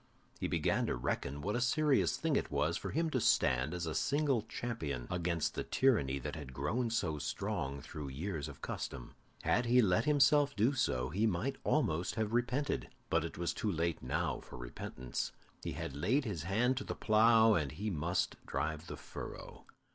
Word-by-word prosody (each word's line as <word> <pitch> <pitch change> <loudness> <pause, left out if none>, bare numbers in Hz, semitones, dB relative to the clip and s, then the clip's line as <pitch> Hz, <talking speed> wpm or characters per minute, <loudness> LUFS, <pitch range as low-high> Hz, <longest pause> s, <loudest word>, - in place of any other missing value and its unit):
He - - -1
began - - +1
to - - 0
reckon 70 +3 -2
what 105 - -1
a 120 - 0
serious 150 +2 +3
thing 160 -3 0
it - - 0
was 75 +3 +1
for - - -4
him 160 +1 0
to 130 - +1
stand 65 - +3
as 90 -1 -3
a 80 - -2
single 140 - +2
champion 80 - -4
against 85 -2 0
the - - -2
tyranny 105 - +2
that 65 - -5
had 70 -4 -8
grown 110 - 0
so 90 -10 -1
strong 70 -1 -3
through 75 +1 -7
years 75 +3 -4
of - - -11
custom. 60 -3 -5 0.3
Had 120 0 +2
he 125 +2 +5
let 95 -3 +3
himself 145 -1 +4
do 115 +6 +3
so, 65 - 0
he 100 +9 +1
might 110 +8 -1
almost 85 +5 +1
have 110 0 -1
repented, 125 - 0 0.2
but 80 -1 +3
it 85 - -5
was 85 0 -1
too 105 - -1
late 85 -1 -1
now 75 +2 -1
for - - -11
repentance. 60 0 -5 0.3
He - - -3
had 70 - -5
laid 130 - +1
his 100 -9 -3
hand 120 +6 +2
to - - -2
the - - -4
plough, 110 0 +5
and 75 -8 0
he 105 +7 -3
must 85 +2 -1
drive 80 +4 -2
the - - -6
furrow. - - -8
90 Hz, 190 wpm, -34 LUFS, 75-120 Hz, 0.3 s, he